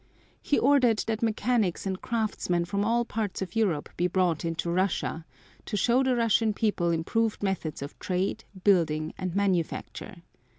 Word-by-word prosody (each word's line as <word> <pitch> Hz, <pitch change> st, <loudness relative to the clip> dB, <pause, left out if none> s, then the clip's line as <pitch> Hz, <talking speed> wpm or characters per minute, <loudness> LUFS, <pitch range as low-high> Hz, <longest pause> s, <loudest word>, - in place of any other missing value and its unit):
He 290 Hz, -, +1 dB
ordered 255 Hz, -5 st, +4 dB
that 220 Hz, -1 st, -2 dB
mechanics 220 Hz, -4 st, 0 dB
and 190 Hz, -1 st, -3 dB
craftsmen 210 Hz, -6 st, -1 dB
from 200 Hz, +4 st, -1 dB
all 235 Hz, +2 st, +1 dB
parts 215 Hz, -4 st, -3 dB
of 185 Hz, +1 st, -9 dB
Europe 190 Hz, -10 st, +1 dB
be 175 Hz, -, +2 dB
brought 180 Hz, -3 st, +1 dB
into 165 Hz, 0 st, -2 dB
Russia 175 Hz, -3 st, -1 dB, 0.4 s
to 210 Hz, -, -2 dB
show 240 Hz, +5 st, +3 dB
the 260 Hz, -1 st, +2 dB
Russian 225 Hz, -2 st, +2 dB
people 205 Hz, -6 st, +1 dB
improved 210 Hz, +7 st, 0 dB
methods 180 Hz, -7 st, -2 dB
of 140 Hz, -, -9 dB
trade, 190 Hz, +4 st, -1 dB, 0.2 s
building 160 Hz, -5 st, +2 dB
and 185 Hz, -2 st, -3 dB
manufacture. 185 Hz, -1 st, -2 dB
195 Hz, 155 wpm, -27 LUFS, 170-225 Hz, 0.4 s, ordered